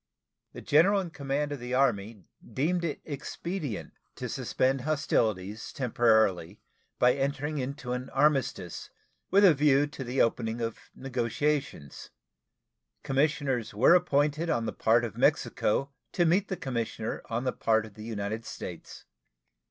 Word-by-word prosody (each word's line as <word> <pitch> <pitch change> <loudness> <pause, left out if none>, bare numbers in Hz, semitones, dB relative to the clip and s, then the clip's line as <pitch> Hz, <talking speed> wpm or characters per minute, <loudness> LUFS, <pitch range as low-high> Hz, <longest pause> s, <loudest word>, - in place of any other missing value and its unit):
The - - -8
general 185 +7 +4
in 180 -3 -4
command 145 0 -2
of 145 - -4
the 125 +1 -3
Army 110 -6 0 0.3
deemed 170 +6 0
it 160 -3 -3
expedient 150 - -5 0.2
to - - -5
suspend 130 +1 0
hostilities 110 -8 -1
temporarily 110 - +2 0.4
by 125 0 +5
entering 140 +2 -2
into 130 -1 -4
an 125 +1 -4
armistice 135 - 0 0.4
with 200 +2 +5
a 180 - +8
view 145 0 +4
to 145 -2 -7
the 125 +2 -3
opening 115 0 +1
of 115 -1 -5
negotiations. 130 - -2 0.9
Commissioners 135 -5 0
were 115 +10 +6
appointed 155 -2 +2
on 115 -7 0
the - - -3
part 115 +2 +3
of 110 - -7
Mexico 135 +6 +1 0.2
to 175 - +2
meet 185 +5 +2
the 190 - -3
commissioner 115 -5 -3
on 115 +2 -2
the 125 - -1
part 110 -1 +1
of 110 - -13
the 110 - -10
United 110 0 -4
States. - - -8
135 Hz, 140 wpm, -28 LUFS, 115-150 Hz, 0.9 s, a